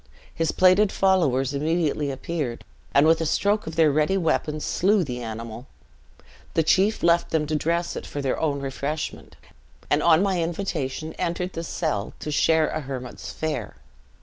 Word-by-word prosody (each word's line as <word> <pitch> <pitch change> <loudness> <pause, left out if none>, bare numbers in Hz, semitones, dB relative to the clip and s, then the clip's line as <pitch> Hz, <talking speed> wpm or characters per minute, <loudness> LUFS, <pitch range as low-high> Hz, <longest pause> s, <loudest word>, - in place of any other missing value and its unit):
His 165 -1 0
plaided 185 +2 +4
followers 145 -9 +2
immediately 150 0 0
appeared, 135 -2 -4 0.3
and 140 +2 +5
with 160 +1 +4
a - - 0
stroke 205 +5 +1
of 160 - -5
their 160 -2 +4
ready 155 +6 +2
weapons 155 -3 0
slew 200 +1 +2
the 125 -5 -5
animal. 115 +2 -7 0.9
The 160 - +3
chief 195 +7 +2
left 170 0 +3
them 160 -2 +1
to 155 - -2
dress 170 +3 -1
it - - -6
for 145 - -5
their 135 -2 -1
own 145 -3 -1
refreshment; 140 +3 -4 0.6
and 145 - +3
on 165 +2 +5
my 190 -3 +1
invitation, 160 -4 -3
entered 180 +2 -2
the 165 - -4
cell 155 - -2
to 150 - -5
share 160 +1 +3
a 155 - -3
hermit's 130 -3 -7
fare. 150 -9 -4
155 Hz, 165 wpm, -24 LUFS, 140-170 Hz, 0.9 s, and